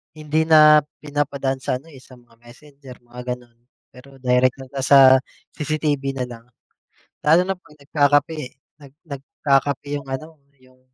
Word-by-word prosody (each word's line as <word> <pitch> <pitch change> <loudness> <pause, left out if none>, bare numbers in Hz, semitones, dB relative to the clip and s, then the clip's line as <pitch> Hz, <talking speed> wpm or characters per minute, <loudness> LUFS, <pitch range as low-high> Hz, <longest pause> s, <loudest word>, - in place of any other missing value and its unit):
hindi 155 +1 -1
na 155 -1 +7 0.2
pinapadaan 140 -2 -2
sa 130 - -2
ano, 160 +4 -19
eh, 135 - -14
sa 130 0 -17
mga 120 -1 -25
messenger 135 +2 -15
mga 120 +1 -11
gano'n, 120 -1 -21 0.3
pero 135 +2 -16
direkto 130 +1 +1
na 135 -1 -4
sa 135 -1 +7 0.4
CCTV 150 -2 -2
nalang. 120 -2 -7 0.8
Lalo 160 +4 +5
na 190 +1 -2
'pag 150 -4 -22
nagkakape, 145 +2 +1 0.4
nag 140 -2 -15
nagkakape 140 -1 -2
yung 140 -1 -8
ano, 155 +5 -7 0.2
yung 130 0 -25
140 Hz, 145 wpm, -21 LUFS, 130-150 Hz, 0.8 s, na